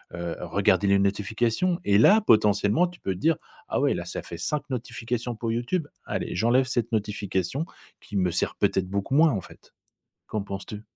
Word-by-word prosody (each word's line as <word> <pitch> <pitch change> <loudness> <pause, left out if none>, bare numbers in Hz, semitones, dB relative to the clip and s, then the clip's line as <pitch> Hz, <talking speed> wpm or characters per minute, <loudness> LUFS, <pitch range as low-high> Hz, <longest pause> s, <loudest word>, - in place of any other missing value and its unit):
heu, 85 -1 -4
regarder 95 +2 +2
les 100 0 +5
notifications 110 - 0
et 100 0 +4
là 205 - +7
potentiellement 105 - +3
tu 175 - -13
peux 95 - -2
dire: 155 - +2 0.3
«Ah - - -1
ouais - - +2
là - - -4
ça - - -5
fait 85 - -8
5 150 +10 -1
notifications 120 0 -3
pour 115 +1 -3
YouTube, 125 +8 -1 0.2
allez, - - -3
j'enlève 120 +6 +3
cette 120 -2 -1
notification 105 - -1 0.4
qui 100 - -5
me 90 -2 +2
sert, 85 - -1
peut - - +2
être, 95 -1 0
beaucoup 100 +6 -2
moins, 160 +2 +6
en 100 -7 -2
fait». - - -16 0.6
Qu'en 110 - -2
penses 100 -1 -6
tu? 105 -1 -7
110 Hz, 190 wpm, -26 LUFS, 100-125 Hz, 0.6 s, là